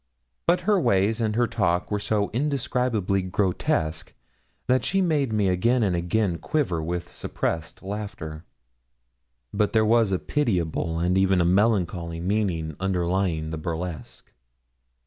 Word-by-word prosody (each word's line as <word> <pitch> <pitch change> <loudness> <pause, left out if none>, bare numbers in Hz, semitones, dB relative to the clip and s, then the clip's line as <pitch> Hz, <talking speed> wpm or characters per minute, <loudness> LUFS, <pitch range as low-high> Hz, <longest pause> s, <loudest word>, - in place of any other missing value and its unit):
But 175 +1 +3
her 200 +2 +3
ways 105 0 +2
and 110 -1 0
her 120 +1 +3
talk 90 -6 0
were 105 - 0
so 100 0 0
indescribably 125 -7 0
grotesque 90 -4 -1 0.5
that 130 0 +2
she 195 - +1
made 150 -9 +1
me 105 -2 +2
again 115 +7 +2
and 95 -4 +1
again 90 +1 0
quiver 120 - -1
with 85 +2 -4
suppressed 80 +2 -4
laughter. 95 -6 -6 1.1
But 105 0 +1
there 110 -1 +4
was 115 -2 +3
a 95 - +2
pitiable 90 - -1
and 90 +3 +2
even 95 -1 +3
a 85 - +3
melancholy 90 -4 +1
meaning 90 -5 -1
underlying 90 -3 0
the 80 - -4
burlesque. 85 +1 -6
95 Hz, 135 wpm, -25 LUFS, 85-110 Hz, 1.1 s, there